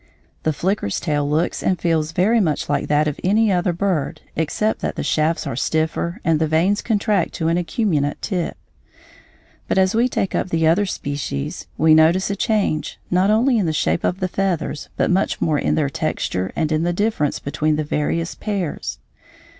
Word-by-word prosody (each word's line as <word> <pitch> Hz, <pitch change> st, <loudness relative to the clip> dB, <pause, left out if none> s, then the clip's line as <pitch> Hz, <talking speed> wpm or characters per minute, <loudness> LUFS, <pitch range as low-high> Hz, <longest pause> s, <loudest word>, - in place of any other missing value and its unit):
The 155 Hz, -, +1 dB
flicker's 170 Hz, -, -1 dB
tail 145 Hz, -3 st, -1 dB
looks 155 Hz, +3 st, 0 dB
and 185 Hz, -, 0 dB
feels 160 Hz, -2 st, 0 dB
very 200 Hz, +8 st, +3 dB
much 160 Hz, -8 st, 0 dB
like 145 Hz, -1 st, 0 dB
that 150 Hz, +1 st, +2 dB
of 150 Hz, -, -3 dB
any 210 Hz, +3 st, +3 dB
other 180 Hz, 0 st, +1 dB
bird 175 Hz, -4 st, -1 dB
except 185 Hz, +7 st, 0 dB
that -, -, -3 dB
the -, -, -3 dB
shafts 160 Hz, +2 st, +1 dB
are 135 Hz, -5 st, -3 dB
stiffer 160 Hz, +5 st, -1 dB
and 160 Hz, -2 st, +3 dB
the 160 Hz, -, +1 dB
vanes 170 Hz, +6 st, +2 dB
contract 210 Hz, -4 st, 0 dB
to 165 Hz, -1 st, 0 dB
an 165 Hz, -, +2 dB
acuminate 165 Hz, -6 st, 0 dB
tip. 180 Hz, -5 st, -3 dB, 1.1 s
But -, -, 0 dB
as 190 Hz, 0 st, +3 dB
we 235 Hz, +3 st, +2 dB
take 210 Hz, -6 st, -1 dB
up -, -, -1 dB
the 165 Hz, -1 st, +1 dB
other 180 Hz, +6 st, +3 dB
species 140 Hz, -, -4 dB
we 155 Hz, 0 st, +5 dB
notice 165 Hz, +5 st, +4 dB
a -, -, -1 dB
change, 200 Hz, -8 st, 0 dB
not 185 Hz, +2 st, +3 dB
only 235 Hz, +3 st, +3 dB
in 190 Hz, -, +1 dB
the 160 Hz, -, 0 dB
shape 155 Hz, -, 0 dB
of 185 Hz, +2 st, -1 dB
the 185 Hz, -, +1 dB
feathers 180 Hz, -5 st, -2 dB
but -, -, +2 dB
much 190 Hz, +2 st, +1 dB
more 150 Hz, -3 st, +1 dB
in -, -, +1 dB
their 150 Hz, -2 st, +1 dB
texture 120 Hz, -, -2 dB
and 160 Hz, -1 st, 0 dB
in 155 Hz, 0 st, +1 dB
the 175 Hz, +1 st, 0 dB
difference 205 Hz, -7 st, 0 dB
between 155 Hz, +2 st, -1 dB
the 155 Hz, -, -1 dB
various 150 Hz, +3 st, -1 dB
pairs. 195 Hz, -7 st, -3 dB
165 Hz, 190 wpm, -21 LUFS, 155-195 Hz, 1.1 s, we